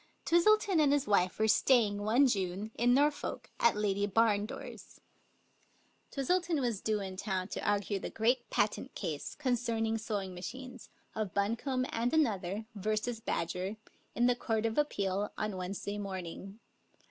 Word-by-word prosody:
Twistleton 385 +1 +4
and 295 -2 +4
his 285 -1 +2
wife 185 -3 +2
were 220 - +2
staying 220 -2 +4
one 230 +7 +4
June 195 -2 -1
in 245 +1 +3
Nor 290 +2 +5
folk, 290 - -6
at 235 - +4
Lady 205 -1 +1
Barndore's. 210 0 -1 1.1
Twistleton 340 +3 0
was 235 -6 -1
due 215 -1 0
in 190 -1 -6
town 190 -1 -2
to - - -5
argue 205 -1 0
the - - -5
great 240 +3 +1
patent 215 +5 -1
case 160 -7 -4
concerning 230 -4 0
sewing 205 -4 -3
machines 250 +7 -8 0.2
of 215 -4 -3
Buncombe 235 +6 0
and 240 +6 0
Another 205 - 0
v. 215 +1 -1 0.3
Badger, 185 +5 -2 0.4
in 240 - +3
the 245 0 +4
Court 225 -2 -1
of 225 +4 +1
Ap 295 0 +2
peal, 200 +1 -1
on 215 -2 -2
Wednesday 195 +3 -4
morning. 195 +1 -6
215 Hz, 150 wpm, -32 LUFS, 200-250 Hz, 1.1 s, Nor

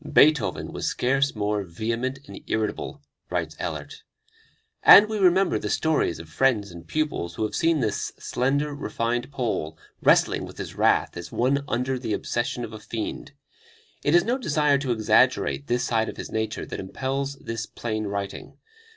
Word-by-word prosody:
"Beethoven 150 0 +3
was - - -3
scarce 135 +2 +1
more 105 0 0
vehement 115 +8 -3
and - - -10
irritable," 110 -1 -2 0.3
writes 85 -3 -2
Ehlert. 75 -5 -5 0.8
And 205 +2 +9
we 215 -1 -3
remember 185 -1 +4
the - - -4
stories 160 - +1
of 80 0 -10
friends 100 +3 +1
and 85 -1 -11
pupils 150 - -2
who - - -2
have 110 - -2
seen 165 -3 +2
this 110 -4 -1
slender, 145 +4 0
refined 120 -1 -2
Pole 110 - -2 0.2
wrestling - - +4
with - - -12
his - - -6
wrath - - +2
as 85 - -7
one 135 +3 +1
under 125 +1 -1
the 115 -4 -2
obsession 120 +4 -2
of - - -11
a 110 - -7
fiend. 110 +1 -5 0.7
It 145 - +3
is 175 - +6
no 250 +4 0
desire 150 - +2
to 135 -3 -2
exaggerate 70 - +2
this 120 0 +1
side 110 -1 +1
of - - -8
his - - -7
nature 110 0 -2
that - - -6
impels 135 +8 -3
this 115 -4 -5
plain 110 -2 -3
writing. 100 -1 -5
120 Hz, 170 wpm, -25 LUFS, 105-140 Hz, 0.8 s, And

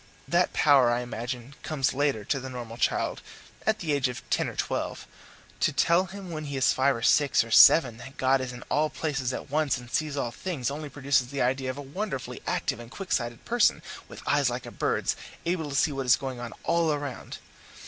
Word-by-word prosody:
That - - +2
power, 140 -5 +5
I 120 +1 +1
imagine, 120 +2 -5
comes 145 -3 0
later 135 -6 0
to 135 - 0
the 130 0 -7
normal 120 -3 -7
child - - 0 0.5
at 220 0 +3
the 165 -7 -1
age 140 -2 +1
of 125 - -8
ten - - +1
or - - -9
twelve. - - -3 0.5
To - - +2
tell 170 +3 +3
him 190 -1 -9
when 155 -1 -5
he 140 -1 -4
is 130 - +3
five 135 +1 +2
or 115 - -6
six 145 -5 +4
or 115 - -11
seven 120 0 +7
that 135 +4 -11
God 130 0 +3
is 130 -1 -4
in 125 0 -9
all 155 +1 +1
places 140 -6 -2
at 130 - -6
once 150 -3 +1
and 120 0 -11
sees 150 -1 -1
all 120 -4 -1
things, 140 -5 -3
only 150 +1 -5
produces 135 -2 +1
the 140 0 -1
idea 130 +1 0
of 130 - -4
a 145 - -6
wonderfully 140 -1 -5
active - - -1
and 120 -1 -10
quick 190 +8 -8
sighted 120 -1 -1
person, 240 -1 +2 0.2
with - - -11
eyes - - +3
like - - -4
a - - -8
bird's, - - 0 0.3
able 165 -3 -1
to 140 - -4
see 155 +2 +3
what 135 -2 -4
is 125 - +7
going 130 -3 -5
on 120 -1 -6
all 165 -3 +2
round. 140 -3 -6
135 Hz, 220 wpm, -27 LUFS, 125-155 Hz, 0.5 s, seven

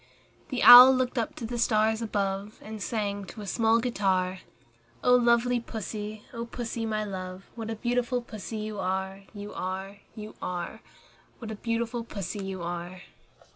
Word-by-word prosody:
The 255 -3 -1
Owl 250 +2 +12
looked 255 0 0
up 225 - -3
to 235 - -6
the 240 +1 -4
stars 220 -1 +2
above, 200 -1 -2
And 215 -1 -8
sang 205 -2 -2
to 215 - -10
a - - -7
small 225 +3 +2
guitar, 190 -6 0 0.6
"Oh 250 - +5
lovely 240 0 +3
Pussy, 215 -2 -6
O 235 -1 -4
Pussy, 230 -1 -4
my 215 -1 -1
love, 185 -2 -7
What 225 -1 -6
a 225 - -2
beautiful 245 +2 0
Pussy 220 -1 -7
you 215 -1 -5
are, 190 +1 -3
You 205 0 -7
are, 190 +2 -5 0.2
You 215 -1 -8
are! 175 -1 -4 0.6
What 225 -2 -7
a - - -4
beautiful 230 +2 -2
Pussy 200 -2 -5
you 190 -2 -5
are!" 175 +1 -5
215 Hz, 165 wpm, -28 LUFS, 195-235 Hz, 0.6 s, Owl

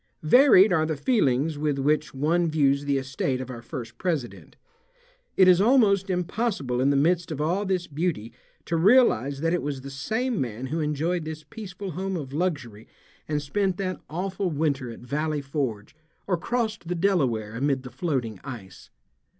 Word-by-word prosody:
Varied 205 - +6
are 160 -3 +3
the 155 -2 -2
feelings 150 - +1
with 150 -2 0
which 150 +2 +1
one 165 +5 +1
views 140 -2 +2
the 140 -1 +1
estate 130 0 -2
of 130 0 -6
our 120 -2 -8
first 120 -2 -8
president. 160 -9 -3 0.8
It 190 - +7
is 180 0 +6
almost 205 -5 +4
impossible 180 - -1
in 135 - +3
the 140 - +2
midst 170 +4 +2
of 150 - -4
all 180 +7 0
this 185 -2 0
beauty 150 -8 -3 0.3
to 170 - -1
realize 160 - +4
that 165 +1 +1
it 175 - 0
was 140 -2 -4
the 140 +1 -8
same 220 - -2
man 120 0 -4
who 155 +5 -3
enjoyed 155 +3 -1
this 155 0 -7
peaceful 200 -3 -7
home 190 +3 -3
of 135 -4 -7
luxury 145 - -3 0.4
and 150 -1 -1
spent 190 +5 -1
that 185 -2 -3
awful 185 +3 -2
winter 145 -5 -1
at 115 - -9
Valley 150 +5 -2
Forge 135 -6 -4 0.3
or 190 - +1
crossed 220 +1 -2
the 180 - -1
Delaware 135 - +1
amid 135 +2 0
the 125 - -9
floating 125 - -2
ice. 100 -9 -10
155 Hz, 175 wpm, -25 LUFS, 135-185 Hz, 0.8 s, It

